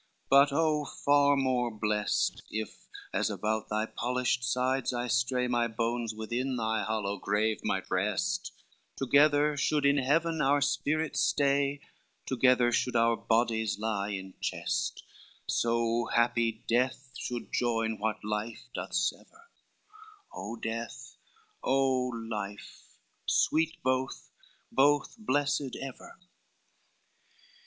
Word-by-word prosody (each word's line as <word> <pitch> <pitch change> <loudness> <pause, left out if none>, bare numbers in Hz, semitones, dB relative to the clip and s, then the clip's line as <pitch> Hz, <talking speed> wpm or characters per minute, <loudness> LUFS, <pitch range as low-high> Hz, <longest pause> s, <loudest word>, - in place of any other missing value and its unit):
but 140 +1 +7
oh 155 0 +2
far 145 0 +3
more 130 -2 +1
blessed 105 -1 0
If 110 0 -6 0.3
as - - +1
about 110 0 -2
thy 110 +1 0
polished 125 +2 -1
sides 130 +1 0
I 120 0 -1
stray, 125 +1 +1
My 120 -1 +1
bones 115 0 -2
within 120 +4 -2
thy 110 -2 0
hollow 100 -2 -2
grave 105 +3 0
might 95 - -1
rest, 105 - 0 0.4
Together 145 +2 +4
should 145 0 +1
in 140 0 +4
heaven 160 +4 +1
our 145 +1 +3
spirits 155 +2 0
stay, 140 -3 +2 0.4
Together 125 -1 +3
should 125 +1 0
our 115 0 +4
bodies 110 -2 +1
lie 105 -2 -2
in 95 -2 -5
chest; 175 - -2 0.4
So 115 0 +1
happy 115 -1 +1
death 130 +2 0
should 120 -1 -5
join 115 -2 0
what 110 0 -2
life 105 +2 -3
doth - - -5
sever, 330 - -3 0.8
O 115 - -5
Death, 115 0 -6 0.5
O 130 -1 +2
Life! 110 -4 -7 0.3
sweet 160 +1 +2
both, 130 +1 -1 0.4
both 145 +1 +3
blessed 145 - 0
ever." 135 -1 -9
125 Hz, 115 wpm, -30 LUFS, 110-140 Hz, 0.8 s, but